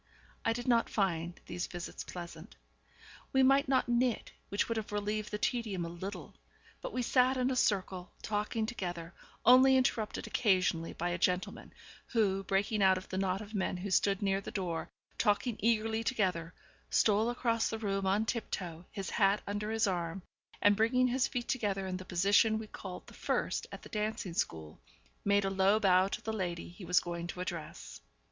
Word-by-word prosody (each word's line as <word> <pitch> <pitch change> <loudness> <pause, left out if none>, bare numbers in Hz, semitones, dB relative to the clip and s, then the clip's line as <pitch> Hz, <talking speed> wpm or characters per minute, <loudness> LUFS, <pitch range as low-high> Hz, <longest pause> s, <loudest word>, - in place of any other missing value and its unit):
I - - +2
did 240 +2 -4
not 235 -2 +3
find 175 -4 -1
these 175 +1 -4
visits 175 -1 -6
pleasant. 170 +1 -9 0.8
We 265 0 +5
might 275 +1 +5
not 260 -3 +3
knit, 240 -1 +1 0.2
which 200 - 0
would 230 - -2
have 215 -1 -4
relieved 210 +1 -2
the 210 - -3
tedium 210 -6 -1
a - - -5
little; 185 +4 -7 0.5
but - - -5
we 250 - -1
sat 255 +2 +3
in 255 +1 +1
a - - 0
circle, 190 -5 0
talking 215 +1 -1
together, 175 -6 -5 0.3
only 260 +2 +8
interrupted 225 -4 0
occasionally 185 -6 +1
by 175 +1 -2
a 175 +1 -2
gentleman, 180 +1 -1 0.4
who, 195 -5 +1
breaking 200 +2 0
out 190 -1 +5
of 185 - -8
the 185 - -3
knot 190 0 0
of 215 0 -10
men 190 -2 -1
who 190 +2 -5
stood 200 +1 +2
near 195 0 +1
the - - -7
door, 175 -4 -3 0.3
talking 220 +2 +2
eagerly 225 0 +1
together, 185 -8 -1 0.3
stole 215 +2 +3
across 230 -2 0
the 225 - -3
room 195 -3 -1
on 205 +3 +2
tiptoe, 180 -7 -4
his 195 -2 -5
hat 200 -1 +3
under 205 +1 -3
his 225 0 +2
arm, 175 -1 -2 0.4
and, 205 0 +6
bringing 250 +4 +3
his 255 +1 +2
feet 240 -1 -4
together 200 -6 -1
in 185 -1 -3
the 185 - -9
position 200 +5 +3
we 220 - -5
called 190 -3 -8
the - - -14
first - - -1
at - - -9
the - - -11
dancing 210 -4 -2
school, 80 - -3 0.4
made 200 0 +3
a 195 - 0
low 195 +2 +3
bow 190 -2 +4
to - - -5
the 220 - -3
lady 175 -5 -3
he 175 +2 -11
was 180 -1 +4
going 170 0 -5
to 175 - -7
address. 170 -4 -6
200 Hz, 185 wpm, -32 LUFS, 185-225 Hz, 0.8 s, only